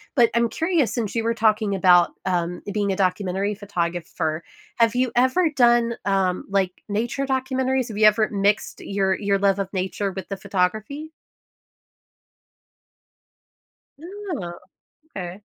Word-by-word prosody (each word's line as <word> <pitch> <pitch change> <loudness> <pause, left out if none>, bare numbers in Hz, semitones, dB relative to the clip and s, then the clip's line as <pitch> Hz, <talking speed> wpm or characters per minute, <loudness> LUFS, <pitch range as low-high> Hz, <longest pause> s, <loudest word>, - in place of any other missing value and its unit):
But 240 -4 +5
I'm 235 0 +2
curious, 320 - 0
since 230 -4 -3
you 230 - 0
were 230 +1 +1
talking 215 -2 +2
about, 180 -2 +5
um, 175 -1 -1
being 205 -1 0
a - - 0
documentary 190 +1 0
photographer, 170 -4 -3 0.4
have 230 0 +3
you 250 -1 +1
ever 260 +8 +3
done, 240 -4 +3
um, 190 -2 0
like, 195 -2 +1 0.2
nature 235 +6 -1
documentaries? 260 -1 0
Have 210 - -6
you 215 - +5
ever 215 +1 +4
mixed 200 0 0
your 195 -1 0
your 200 -1 +1
love 200 0 +2
of 195 -1 -3
nature 190 +1 -2
with 190 0 -7
the 195 - -4
photography? 215 +11 -2 2.9
Oh, 350 - -6 0.6
okay. 185 +1 -6
205 Hz, 135 wpm, -23 LUFS, 190-240 Hz, 2.9 s, But